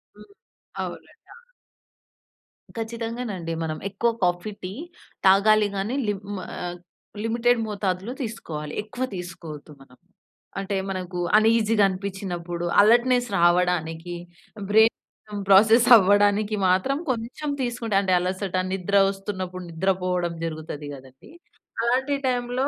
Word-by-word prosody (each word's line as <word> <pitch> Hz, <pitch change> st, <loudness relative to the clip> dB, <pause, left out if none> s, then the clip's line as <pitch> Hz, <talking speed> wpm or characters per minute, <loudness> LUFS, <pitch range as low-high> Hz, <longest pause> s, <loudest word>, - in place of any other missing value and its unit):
హ్మ్. -, -, -16 dB, 0.5 s
అవునండి, -, -, -8 dB, 0.2 s
అవును. 480 Hz, -, -18 dB, 1.3 s
ఖచ్చితంగా 230 Hz, +2 st, -4 dB
నండి. 165 Hz, -3 st, -4 dB
మనం 155 Hz, -1 st, -3 dB
ఎక్కువ 220 Hz, +4 st, 0 dB
కాఫీ, 175 Hz, +4 st, 0 dB
టీ 185 Hz, +1 st, -5 dB, 0.5 s
తాగాలి 210 Hz, +2 st, +5 dB
కానీ 215 Hz, +7 st, -2 dB
లిం 205 Hz, -2 st, -1 dB, 0.4 s
ఆహ్, 175 Hz, 0 st, -5 dB, 0.5 s
లిమిటెడ్ 235 Hz, +1 st, +2 dB
మోతాదులో 200 Hz, +2 st, -2 dB
తీసుకోవాలి. 155 Hz, -10 st, -6 dB
ఎక్కువ 245 Hz, +4 st, -5 dB
తీసుకోవద్దు 165 Hz, -4 st, -8 dB
మనం. 125 Hz, -2 st, -18 dB, 0.6 s
అంటే, 195 Hz, 0 st, -3 dB
మనకు 185 Hz, -1 st, -4 dB, 0.2 s
అన్ఈజీగా 220 Hz, -1 st, +3 dB
అనిపించినప్పుడు, 185 Hz, -3 st, -4 dB, 0.2 s
అలర్ట్‌నెస్ 245 Hz, +3 st, +4 dB
రావడానికి, 175 Hz, -1 st, +1 dB, 0.5 s
బ్రైన్ 215 Hz, -1 st, +1 dB
ప్రాసెస్ 220 Hz, +5 st, +6 dB
అవ్వడానికి 205 Hz, +1 st, +4 dB
మాత్రం 190 Hz, +10 st, +2 dB
కొంచెం 255 Hz, +5 st, -3 dB
తీసుకుంటే 235 Hz, -4 st, -2 dB
అంటే 190 Hz, -2 st, +1 dB
అలసట, 185 Hz, +1 st, -3 dB, 0.2 s
నిద్ర 195 Hz, +1 st, 0 dB
వస్తున్నప్పుడు, 190 Hz, -2 st, -5 dB
నిద్ర 185 Hz, +4 st, +1 dB
పోవడం 180 Hz, -2 st, -1 dB
జరుగుతది 155 Hz, -2 st, -6 dB
కదండీ! 130 Hz, -, -14 dB, 0.5 s
అలాంటి 260 Hz, +4 st, +1 dB
టైంలో 245 Hz, +1 st, 0 dB
195 Hz, 110 wpm, -24 LUFS, 180-225 Hz, 1.3 s, ప్రాసెస్